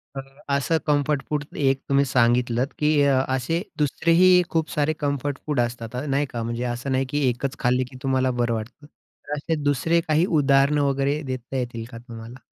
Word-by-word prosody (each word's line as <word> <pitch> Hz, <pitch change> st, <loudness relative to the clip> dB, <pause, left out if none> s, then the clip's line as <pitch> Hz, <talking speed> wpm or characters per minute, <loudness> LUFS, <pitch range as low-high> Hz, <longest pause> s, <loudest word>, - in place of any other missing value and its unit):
अ, 135 Hz, -, -3 dB, 0.3 s
असं 140 Hz, +4 st, +1 dB
comfort 145 Hz, -1 st, +1 dB
food 150 Hz, -1 st, -1 dB
एक 135 Hz, -1 st, +1 dB
तुम्ही 140 Hz, 0 st, +3 dB
सांगितलत 120 Hz, 0 st, +2 dB
की 150 Hz, 0 st, +2 dB
अ, 135 Hz, -2 st, +3 dB
असे 135 Hz, +7 st, -1 dB, 0.2 s
2रेही 170 Hz, +5 st, +4 dB
खूप 160 Hz, -1 st, -1 dB
सारे 150 Hz, +1 st, 0 dB
कम्फर्ट 140 Hz, -1 st, -2 dB
फूड 150 Hz, -4 st, -1 dB
असतात. 120 Hz, 0 st, -3 dB
अ, 130 Hz, +4 st, -3 dB
नाही 140 Hz, +1 st, 0 dB
का, 115 Hz, -2 st, -4 dB
म्हणजे 115 Hz, +1 st, -3 dB
असं 125 Hz, +3 st, -5 dB
नाही 130 Hz, +1 st, +1 dB
की 145 Hz, -2 st, 0 dB
एकच 130 Hz, +3 st, -3 dB
खाल्ली 125 Hz, +1 st, +2 dB
की 130 Hz, -, -11 dB
तुम्हाला 130 Hz, -1 st, +1 dB
बरं 120 Hz, -1 st, +1 dB
वाटतं. 115 Hz, +6 st, -6 dB
तर 150 Hz, -1 st, -13 dB
असे 160 Hz, +2 st, -2 dB
2रे 155 Hz, +4 st, +2 dB
काही 155 Hz, +3 st, +3 dB
उदाहरणं, 145 Hz, -3 st, +3 dB
वगैरे 140 Hz, +2 st, 0 dB
देता 130 Hz, 0 st, -6 dB
येतील 120 Hz, -2 st, -4 dB
का 115 Hz, -, -8 dB
तुम्हाला? 115 Hz, +1 st, -10 dB
135 Hz, 185 wpm, -23 LUFS, 125-150 Hz, 0.3 s, 2रेही